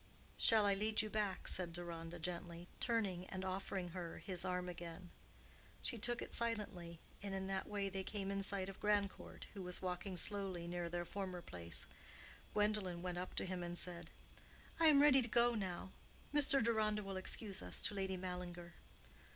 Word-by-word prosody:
"Shall 220 -2 +6
I 200 - +5
lead 215 +2 +3
you 215 - -4
back?" 205 -3 -1
said 175 -2 +2
Deronda, 170 -1 -5
gently, 175 0 -4
turning 200 -7 0
and 190 0 -4
offering 190 -1 -2
her 170 -1 -5
his 180 -3 -4
arm 180 -1 -1
again. 175 0 -7 0.7
She 235 - 0
took 240 +3 +1
it - - -7
silently, 205 -8 -2 0.2
and 200 -1 -3
in 190 0 -2
that 190 0 -2
way 200 -1 -1
they 195 0 -2
came 195 -1 -3
in 200 0 0
sight 195 -1 +2
of 195 - -8
Grandcourt, 205 -2 0
who 200 - -6
was 180 -1 0
walking 180 +1 -2
slowly 190 -2 +4
near 175 0 -2
their 175 0 -2
former 185 -2 -4
place. 85 - -2 0.7
Gwendolen 205 -4 +1
went 180 -1 -2
up 180 - -5
to - - +1
him 185 -1 -3
and 175 0 -3
said, 175 -1 -2 0.7
"I 325 - +7
am 290 -2 +8
ready 270 -3 +7
to 235 - -2
go 240 +1 +4
now. 190 -3 -3 0.4
Mr. 280 -2 +6
Deronda 215 -2 +2
will 195 0 -4
excuse 195 +1 +1
us 90 0 -3
to - - 0
Lady 190 -1 -1
Mallinger." 180 -1 -5
190 Hz, 180 wpm, -40 LUFS, 175-210 Hz, 0.7 s, am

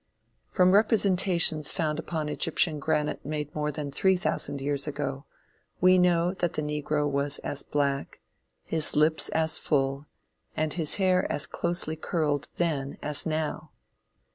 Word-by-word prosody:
From 185 0 +3
representations 185 -7 +3
found 155 -1 -2
upon 160 -2 -4
Egyptian 155 0 +1
granite 150 0 -1
made 150 0 -5
more 150 0 -2
than 145 -1 -5
three 190 +6 +2
thousand 145 -5 -1
years 140 +1 -2
ago, 145 -1 -4 0.5
we 185 0 +5
know 175 0 +2
that 175 -2 0
the 155 - -2
negro 150 0 -1
was 140 0 0
as 145 - -1
black, 140 -1 -2 0.4
his 160 -2 0
lips 155 +2 +2
as 160 0 +1
full, 140 0 -1 0.5
and 155 -1 -1
his 160 -4 +2
hair 185 -2 +1
as 145 - 0
closely 170 -2 -3
curled 150 -3 -2
then 145 -5 -2
as 150 +2 +4
now. 155 0 -3
155 Hz, 140 wpm, -27 LUFS, 145-170 Hz, 0.5 s, we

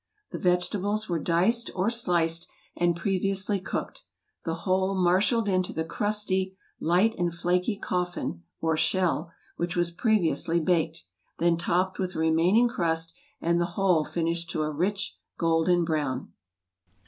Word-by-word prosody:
The - - -5
vegetables 200 +4 0
were 170 -2 -1
diced 185 +10 +2
or 190 +4 +1
sliced 170 -7 +2 0.3
and 175 -1 +2
previously 195 +2 +1
cooked, 185 - -5 0.4
the 165 -1 -1
whole 190 +1 +1
marshaled 190 +5 +2
into 185 -2 0
the 160 - -1
crusty, 190 -1 0 0.2
light 185 +7 +3
and 175 -1 +1
flaky 180 +4 0
coffin, 175 - -3 0.2
or 160 -1 +1
shell, 170 -1 0 0.3
which 170 0 -2
was 175 -1 +1
previously 170 - +1
baked, 165 - 0 0.3
then 170 0 +3
topped 180 +2 0
with 185 -1 -2
the - - -4
remaining 170 +9 +4
crust, 165 -6 -1 0.3
and 170 +1 +2
the - - +2
whole 185 -5 +3
finished 170 +1 -2
to 155 - -1
a 155 - -2
rich 195 +6 -2 0.2
golden 165 +1 +2
brown. 145 -5 -2
175 Hz, 140 wpm, -27 LUFS, 165-190 Hz, 0.4 s, remaining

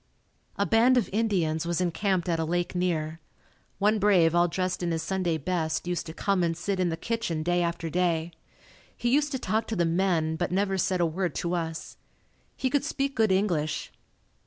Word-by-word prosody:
A - - +1
band 240 +3 +4
of 235 - 0
Indians 175 -8 0
was 175 0 0
encamped 180 +1 0
at 165 -2 0
a - - +1
lake 175 +2 -1
near. 165 -3 -1 0.6
One 210 +2 +2
brave 185 -5 +4
all 175 0 +4
dressed 185 +2 -2
in 175 - -1
his 165 -1 -1
Sunday 180 -2 0
best 160 +1 -2
used 175 -1 -2
to 160 - -7
come 195 -2 +1
and 165 -1 0
sit 190 +2 -2
in 180 -1 +2
the 165 - -3
kitchen 175 -6 -2
day 175 +1 +1
after 170 -1 -2
day. 170 -1 0 0.7
He 240 0 0
used 295 0 +2
to 265 - -1
talk 220 -1 -1
to 225 - -3
the 175 -3 +2
men 165 -2 +1
but 175 - -2
never 195 0 0
said 185 0 +1
a - - +4
word 170 0 -2
to 175 0 -2
us. 165 -2 -4 0.6
He 265 - 0
could 285 -2 +2
speak 275 -1 -2
good 220 -3 +3
English. 165 -6 0
175 Hz, 200 wpm, -27 LUFS, 165-200 Hz, 0.7 s, band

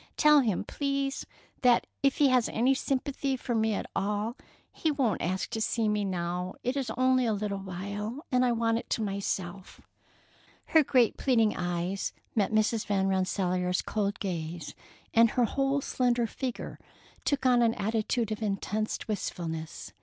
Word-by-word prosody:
Tell 300 -1 +7
him, 220 -9 +1
please, 275 -1 -2 0.3
that 245 -2 +4 0.2
if 275 -1 +2
he 285 -2 +5
has 250 -2 +3
any 250 +4 +3
sympathy 270 0 -1
for 245 - -3
me 220 -1 +2
at - - -3
all, 210 +3 -1 0.4
he 320 - -1
won't 270 -8 +1
ask 185 +2 -2
to 220 - -2
see 225 0 +1
me 210 -1 +1
now. 180 -1 -2
It 250 +2 -1
is 275 -3 -2
only 255 -1 +3
a 220 - +2
little 200 -1 -2
while, 200 - -5
and 250 0 +3
I 250 - +3
want 230 -1 +1
it - - -11
to 225 - 0
myself." 195 -2 -4 0.9
Her 320 -1 +5
great 250 -4 +3
pleading 225 -5 +3
eyes 175 +2 -2 0.2
met 210 -2 +1
Mrs. 215 +1 +2
Van 195 -2 +1
Rensselaer's 185 -1 0
cold 205 -2 -1
gaze, 170 -4 -4 0.4
and 230 0 +6
her 245 +1 +2
whole 275 +3 0
slender 245 -3 +1
figure 250 +2 -5 0.4
took 285 -2 0
an 250 -1 +5
attitude 220 +2 -1
of 215 - -3
intense 215 +1 -2
wistfulness. 165 -6 -4
220 Hz, 160 wpm, -29 LUFS, 195-255 Hz, 0.9 s, Tell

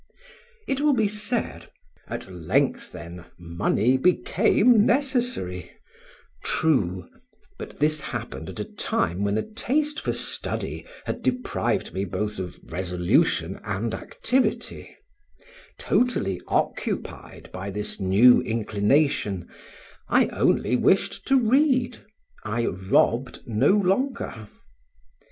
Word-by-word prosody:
It 270 0 -1
will 295 -1 +4
be 220 -3 +2
said; 210 +3 -3 0.4
"at - - -6
length, 90 -4 -1
then, 85 +3 -9
money 90 +8 +1
became 205 - +4
necessary" 245 - 0 0.7
true; 95 - +1 0.5
but - - -8
this 155 +1 +1
happened - - -6
at - - -8
a - - -1
time 90 +4 -1
when 100 +1 +1
a - - 0
taste 295 +7 -1
for - - -2
study - - -2 0.2
had - - -4
deprived 250 - -1
me 95 - -2
both 105 +2 -3
of 90 -2 -5
resolution 90 - 0
and 110 +2 -3
activity; 255 +2 -2 0.8
totally 95 - 0
occupied - - -3
by 95 +2 -5
this 105 +1 -4
new 100 +6 +6
inclination, 105 - 0 0.6
I - - +4
only 125 - +1
wished 185 +9 +1
to 270 -1 +5
read, 255 0 +2 0.4
I 115 +2 -1
robbed 105 +7 +1
no 110 -2 +2
longer. 200 - 0
120 Hz, 105 wpm, -25 LUFS, -, 0.8 s, new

